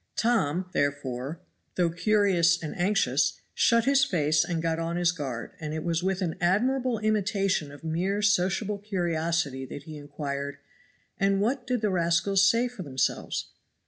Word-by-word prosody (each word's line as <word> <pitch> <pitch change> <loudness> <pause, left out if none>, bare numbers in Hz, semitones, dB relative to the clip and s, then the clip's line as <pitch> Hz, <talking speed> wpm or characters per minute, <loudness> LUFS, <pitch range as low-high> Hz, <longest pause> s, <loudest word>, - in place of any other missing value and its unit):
Tom, 185 -7 +1
therefore, 140 +2 -2 0.3
though 175 -2 +2
curious 180 -2 +3
and 155 - -5
anxious, 195 +3 +1
shut 235 -1 +3
his 275 0 +4
face 155 - +2
and 170 -2 -2
got 165 0 -1
on 165 +1 -2
his 175 -1 +2
guard, 135 -9 -5
and 155 -2 -4
it 160 - -3
was 170 -1 0
with 190 +1 -1
an 165 -3 -1
admirable 245 +7 +1
imitation 200 -7 0
of 145 +2 -13
mere 185 +6 -1
sociable 200 +1 +1
curiosity 170 -8 -1
that 140 +2 -8
he 155 0 -9
inquired, 140 -1 -5 0.6
"And 195 -1 +2
what 245 +5 -1
did 250 -3 0
the 210 -2 +1
rascals 185 +3 +3
say 235 +2 +2
for 245 -5 -9
themselves?" 135 -6 -2
175 Hz, 155 wpm, -27 LUFS, 155-205 Hz, 0.6 s, his